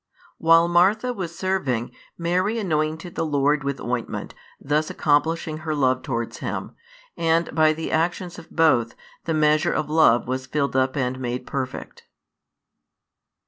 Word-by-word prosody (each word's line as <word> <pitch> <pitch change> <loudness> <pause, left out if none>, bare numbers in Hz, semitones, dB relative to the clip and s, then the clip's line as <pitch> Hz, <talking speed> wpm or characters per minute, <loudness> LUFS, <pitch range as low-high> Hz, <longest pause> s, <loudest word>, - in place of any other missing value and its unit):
While 165 +1 +5
Martha 200 +8 +3
was 170 -6 -6
serving, 140 -12 -1 0.3
Mary 185 +6 0
anointed 160 -3 -2
the - - -2
Lord 145 -1 +1
with 140 0 -3
ointment, 120 -1 -4 0.3
thus 150 +2 0
accomplishing 155 +1 0
her 155 -1 -3
love 130 -2 +2
towards 115 -3 -4
Him; - - -4 0.4
and 165 0 +1
by 155 -1 +4
the 160 +1 -5
actions 175 +2 -1
of 160 - -14
both, 140 -9 +2 0.3
the 165 - 0
measure 155 0 +3
of 150 - -2
love 135 -8 +4
was 130 0 -3
filled 140 0 -1
up 130 +1 +1
and 130 -1 -1
made 125 0 -3
perfect. 130 -2 -6
155 Hz, 140 wpm, -23 LUFS, 130-170 Hz, 0.4 s, While